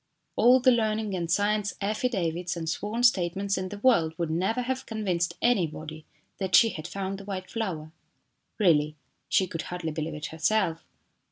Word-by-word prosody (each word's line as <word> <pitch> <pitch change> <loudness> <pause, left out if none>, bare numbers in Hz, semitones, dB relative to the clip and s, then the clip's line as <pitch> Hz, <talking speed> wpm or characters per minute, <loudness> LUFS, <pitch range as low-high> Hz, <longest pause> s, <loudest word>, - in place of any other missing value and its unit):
All 250 +2 +6
the 255 +1 +5
learning 220 -3 0
and 170 -2 -3
science 205 +3 +1
affidavits 190 -5 -1
and 165 -1 -4
sworn 210 +8 -2
statements 195 -3 +2
in 185 0 -3
the 205 - -7
world 200 -9 +3
would 170 -2 -2
never 190 +9 0
have 260 +1 -3
convinced 190 -6 -1
anybody 155 -8 0 0.3
that 190 -3 +1
she 225 - +7
had 155 -5 -6
found 195 0 -4
the 200 - -10
white 190 -2 -5
flower. 170 -9 -3 0.7
Really, 155 -7 +3 0.3
she 190 - +3
could 165 -2 -5
hardly 175 -3 -3
believe 155 0 -4
it 150 - -6
herself. 165 0 +1
190 Hz, 165 wpm, -27 LUFS, 165-215 Hz, 0.7 s, she